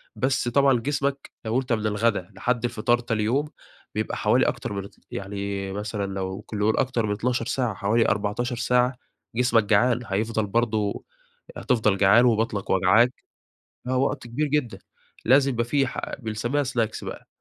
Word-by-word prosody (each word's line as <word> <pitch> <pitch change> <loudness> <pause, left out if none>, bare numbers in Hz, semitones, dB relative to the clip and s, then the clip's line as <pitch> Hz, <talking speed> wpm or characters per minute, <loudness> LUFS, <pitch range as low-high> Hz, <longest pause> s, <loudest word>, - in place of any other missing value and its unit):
بس 130 -2 0
طبعًا 135 0 +4
جسمك 140 +2 -2
لو 110 +3 +1
أنت 130 -2 -2
من 110 -1 -1
الغدا 105 -3 0
لحد 120 +4 -1
الفطار 120 +1 +1
تاني 115 -3 -1
يوم، 135 +7 +1 0.5
بيبقى - - -2
حوالي - - +3
أكتر - - -3
مرتي 100 0 -7
يعني 100 0 -4
مثلًا 105 0 -3
لو 95 +1 -4
كل 105 0 -7
يوم 110 +1 +2
أكتر 125 -4 0
من 105 - -2
12 115 +3 -1
ساعة، 125 -2 -1
حوالي 110 +4 +1
14 105 +4 -1
ساعة 125 +1 +1 0.4
جسمك 120 -2 +3
جعان، 110 +4 +3
هيفضل 110 +1 -1
برضه 110 -1 0 0.5
هتفضل 110 -6 +1
جعان، 105 +5 +6
وبطنك 110 -4 0
وجعاك. 105 +7 +4 0.7
آه 130 0 +1
وقت 130 -2 -1
كبير 145 +6 -1
جدًا. 130 -9 -1 0.5
لازم 135 +2 +5
يبقى 115 -2 0
في 135 +2 +1
ح - - -4 0.2
بنسميها 120 +4 -1
سناكس 120 -4 -2
بقى. - - -8
115 Hz, 160 wpm, -25 LUFS, 105-125 Hz, 0.7 s, جعان